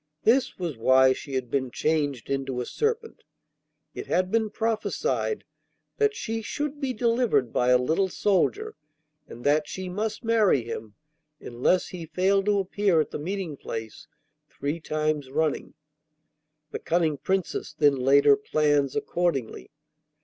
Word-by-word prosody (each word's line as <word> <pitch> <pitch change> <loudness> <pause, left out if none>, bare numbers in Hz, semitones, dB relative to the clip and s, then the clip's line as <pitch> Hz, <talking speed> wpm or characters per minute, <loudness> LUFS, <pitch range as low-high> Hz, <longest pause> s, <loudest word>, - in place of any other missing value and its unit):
This 250 +3 +3
was 170 -8 -4
why 130 +2 +5
she 135 +1 -7
had 125 -2 -3
been 130 -2 0
changed 145 -3 -1
into 135 -2 -2
a 125 - -2
serpent. 450 - -2 0.7
It - - -7
had 185 0 +1
been 220 -1 +1
prophesied 225 - -1 0.5
that 430 -1 +2
she 225 - -3
should 290 +6 -4
be 270 -2 0
delivered 230 - +1
by 125 0 +2
a 125 - +6
little 160 +10 +1
soldier, 395 - 0 0.5
and 120 - -11
that 150 +1 +2
she 185 -1 -5
must 215 +5 -3
marry 220 - +3
him, 110 -2 -7 0.4
unless 125 +9 0
he 170 -3 -7
failed 195 +3 +1
to 205 -1 +3
appear 195 -2 +1
at 155 - -1
the - - -4
meeting 180 -1 -4
place 110 -3 -7 0.4
three 145 +4 -4
times 155 -3 -2
running. 155 +2 -1 1.0
The - - -4
cunning 165 -3 0
Princess 190 +4 -2
then 145 -2 +3
laid 135 +2 +3
her 140 -1 +8
plans 145 -1 +1
accordingly. 175 - -2
160 Hz, 145 wpm, -26 LUFS, 135-210 Hz, 1.0 s, her